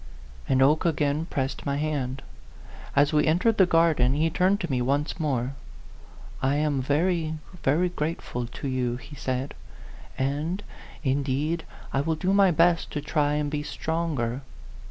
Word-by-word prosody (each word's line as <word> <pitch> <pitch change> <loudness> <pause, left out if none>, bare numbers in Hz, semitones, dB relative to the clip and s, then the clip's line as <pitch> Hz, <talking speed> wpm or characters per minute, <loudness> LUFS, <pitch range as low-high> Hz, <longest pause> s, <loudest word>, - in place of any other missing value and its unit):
And 130 0 +4
Oke 150 +3 +4
again 150 -1 +1
pressed 135 -3 -2
iny 140 -1 -1
hand. 140 -3 -2 0.7
As 145 +2 +4
we 150 0 +3
entered 185 +8 +2
the 190 - +7
garden, 160 -7 +3
he 160 +2 +1
turned 185 +4 +2
to 175 - -3
me 125 -2 +1
once 140 +7 0
more. 135 -4 -1 0.4
" - - -18
I - - +1
am 145 -2 +1
very, 160 +3 +1 0.3
very 165 +7 +2
grateful 150 -7 -3
to 140 - -6
you," 125 -2 0
he 145 +3 -11
said, 130 -1 -3 0.6
"and, 150 +9 -1 0.4
indeed, 140 +4 0 0.3
I 135 - +2
will 160 +2 0
do 185 +5 0
my 200 -1 +6
best 170 0 +3
to 150 - -2
try 145 -1 +1
and 150 -1 -1
be 150 -1 -1
stronger. 150 -6 -2
150 Hz, 155 wpm, -26 LUFS, 135-165 Hz, 0.7 s, the